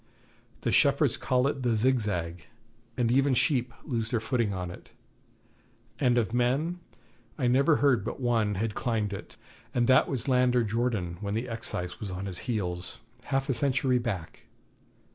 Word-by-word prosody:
The -, -, 0 dB
shepherds -, -, +3 dB
call 125 Hz, 0 st, +1 dB
it 140 Hz, -1 st, -1 dB
the 120 Hz, -2 st, +1 dB
Zigzag, 105 Hz, -9 st, 0 dB, 0.5 s
and 120 Hz, -2 st, +2 dB
even 135 Hz, +1 st, +3 dB
sheep 125 Hz, -1 st, +2 dB
lose 115 Hz, -6 st, -2 dB
their 115 Hz, -, +1 dB
footing 115 Hz, -2 st, 0 dB
on 90 Hz, -2 st, -4 dB
it; -, -, -12 dB, 1.1 s
and 125 Hz, -3 st, +3 dB
of 115 Hz, -2 st, 0 dB
men 135 Hz, +9 st, +1 dB, 0.6 s
I 135 Hz, -, -1 dB
never 135 Hz, +5 st, +4 dB
heard 130 Hz, -9 st, +3 dB
but 110 Hz, -, -5 dB
one 115 Hz, -5 st, +1 dB
had 105 Hz, +2 st, -1 dB
climbed 110 Hz, -3 st, -1 dB
it, 100 Hz, -, -9 dB, 0.4 s
and 120 Hz, -1 st, +3 dB
that 130 Hz, +2 st, +5 dB
was 130 Hz, -3 st, -3 dB
lander 125 Hz, -2 st, +3 dB
Jordan, 110 Hz, -6 st, -1 dB
when 100 Hz, 0 st, -2 dB
the 115 Hz, +3 st, -2 dB
Excise 100 Hz, -6 st, -4 dB
was 105 Hz, -, -5 dB
on 95 Hz, +1 st, -5 dB
his 95 Hz, -3 st, -3 dB
heels, 90 Hz, -6 st, -3 dB, 0.3 s
half 135 Hz, 0 st, -1 dB
a 135 Hz, -, +1 dB
century 130 Hz, 0 st, +1 dB
back. 100 Hz, -10 st, -5 dB
120 Hz, 160 wpm, -28 LUFS, 105-130 Hz, 1.1 s, that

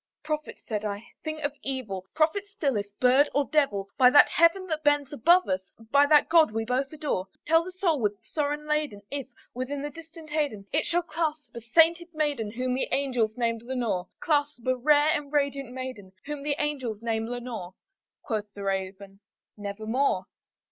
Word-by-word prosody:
"Prophet!" 305 Hz, 0 st, -4 dB
said 210 Hz, -2 st, -3 dB
I, 210 Hz, +1 st, -5 dB
"thing 310 Hz, -1 st, -4 dB
of 285 Hz, 0 st, 0 dB
evil! 215 Hz, -9 st, -4 dB
prophet 325 Hz, +6 st, +1 dB
still, 325 Hz, -, -1 dB
if 205 Hz, -1 st, -1 dB
bird 260 Hz, +3 st, +5 dB
or 285 Hz, 0 st, +3 dB
devil! 240 Hz, -12 st, +1 dB
By 250 Hz, -1 st, +8 dB
that 290 Hz, +3 st, +7 dB
Heaven 335 Hz, +4 st, +3 dB
that 315 Hz, -3 st, -3 dB
bends 290 Hz, -2 st, +2 dB
above 345 Hz, +8 st, +4 dB
us 190 Hz, 0 st, -2 dB, 0.2 s
by 285 Hz, +1 st, +6 dB
that 300 Hz, 0 st, +5 dB
God 325 Hz, -4 st, +6 dB
we 225 Hz, +1 st, -2 dB
both 255 Hz, +3 st, -1 dB
adore 295 Hz, -12 st, -2 dB, 0.2 s
Tell 325 Hz, +1 st, +4 dB
this 370 Hz, +1 st, -10 dB
soul 335 Hz, -7 st, +2 dB
with 205 Hz, -1 st, 0 dB
sorrow 295 Hz, -1 st, -1 dB
laden 300 Hz, -8 st, -2 dB
if, 280 Hz, -2 st, -4 dB, 0.3 s
within 275 Hz, +3 st, -4 dB
the 295 Hz, -, -4 dB
distant 320 Hz, 0 st, -12 dB
Aidenn, 285 Hz, -10 st, -1 dB
It 305 Hz, -, +1 dB
shall 345 Hz, +1 st, +1 dB
clasp 315 Hz, -4 st, -3 dB
a 235 Hz, -, -6 dB
sainted 330 Hz, +8 st, +4 dB
maiden 290 Hz, -8 st, 0 dB
whom 255 Hz, +1 st, -1 dB
the 260 Hz, -, 0 dB
angels 250 Hz, -6 st, 0 dB
name 230 Hz, -2 st, 0 dB
Lenore 235 Hz, -7 st, -2 dB
Clasp 290 Hz, -5 st, 0 dB
a 255 Hz, 0 st, +2 dB
rare 295 Hz, +4 st, +4 dB
and 295 Hz, -2 st, -1 dB
radiant 280 Hz, -3 st, 0 dB
maiden 250 Hz, -7 st, -7 dB
whom 295 Hz, 0 st, -5 dB
the 285 Hz, 0 st, 0 dB
angels 260 Hz, -8 st, -3 dB
name 225 Hz, -1 st, -1 dB
Lenore." 235 Hz, -7 st, -6 dB, 0.5 s
Quoth 210 Hz, -2 st, -3 dB
the 200 Hz, -, -7 dB
Raven, 195 Hz, 0 st, -4 dB, 0.4 s
"Nevermore." 215 Hz, +1 st, -1 dB
275 Hz, 180 wpm, -27 LUFS, 225-300 Hz, 0.5 s, By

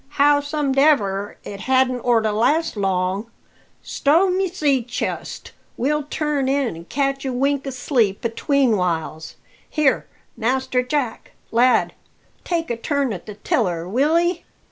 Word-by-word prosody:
"How 290 Hz, 0 st, +5 dB
somedever, 275 Hz, -9 st, +1 dB
it 200 Hz, -, -8 dB
hadn't 260 Hz, +2 st, +2 dB
orter 225 Hz, -3 st, +2 dB
last 285 Hz, +10 st, +1 dB
long. 195 Hz, +2 st, -1 dB, 0.5 s
Stow 335 Hz, +7 st, +2 dB
my 380 Hz, +1 st, +1 dB
sea 295 Hz, -7 st, +1 dB
chest! 245 Hz, +1 st, -5 dB, 0.3 s
we'll 300 Hz, +4 st, +1 dB
turn 295 Hz, -3 st, -1 dB
in 270 Hz, -7 st, 0 dB
an' 165 Hz, +1 st, -10 dB
catch 275 Hz, +4 st, -1 dB
a 265 Hz, -, -2 dB
wink 275 Hz, +2 st, 0 dB
o' -, -, -1 dB
sleep 245 Hz, -6 st, 0 dB
atween 245 Hz, 0 st, +2 dB
whiles. 160 Hz, -3 st, -3 dB, 0.3 s
Here, 290 Hz, -4 st, +1 dB, 0.3 s
Master 255 Hz, +2 st, 0 dB
Jack, 250 Hz, -2 st, -3 dB, 0.2 s
lad! 240 Hz, 0 st, +3 dB, 0.5 s
take 335 Hz, -5 st, -2 dB
a 235 Hz, -, -2 dB
turn 280 Hz, 0 st, -1 dB
at 185 Hz, -, -9 dB
the 210 Hz, -, -7 dB
tiller, 180 Hz, -5 st, -1 dB
will 280 Hz, -, +2 dB
'ee?" 345 Hz, +1 st, 0 dB
260 Hz, 140 wpm, -21 LUFS, 220-285 Hz, 0.5 s, How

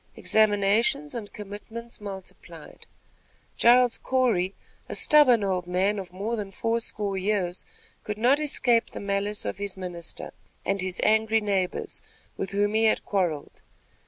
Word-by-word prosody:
Examinations 220 Hz, +7 st, +2 dB
and 225 Hz, -4 st, -6 dB
commitments 215 Hz, +3 st, -9 dB
multiplied. 195 Hz, -2 st, -10 dB, 0.7 s
Giles 245 Hz, 0 st, +5 dB
Corey, 225 Hz, -8 st, +1 dB, 0.3 s
a -, -, -4 dB
stubborn 260 Hz, -8 st, +5 dB
old 185 Hz, -3 st, -1 dB
man 190 Hz, +3 st, +1 dB
of 185 Hz, -2 st, -8 dB
more 205 Hz, +6 st, -3 dB
than 205 Hz, -3 st, -4 dB
four 230 Hz, +4 st, -1 dB
score 205 Hz, -4 st, -1 dB
years, 190 Hz, -2 st, -1 dB, 0.4 s
could 210 Hz, 0 st, -4 dB
not 250 Hz, +6 st, +3 dB
escape 245 Hz, -6 st, +2 dB
the -, -, -8 dB
malice 200 Hz, +1 st, -1 dB
of -, -, -4 dB
his 200 Hz, -1 st, -4 dB
minister 175 Hz, -3 st, -7 dB, 0.3 s
and 195 Hz, +1 st, 0 dB
his 185 Hz, -1 st, -2 dB
angry 220 Hz, +1 st, +3 dB
neighbors, 195 Hz, -4 st, -2 dB, 0.3 s
with 195 Hz, -, -4 dB
whom 205 Hz, +2 st, 0 dB
he 220 Hz, +1 st, +3 dB
had 220 Hz, -, +2 dB
quarrelled. 175 Hz, -7 st, -2 dB
205 Hz, 140 wpm, -26 LUFS, 190-230 Hz, 0.7 s, Giles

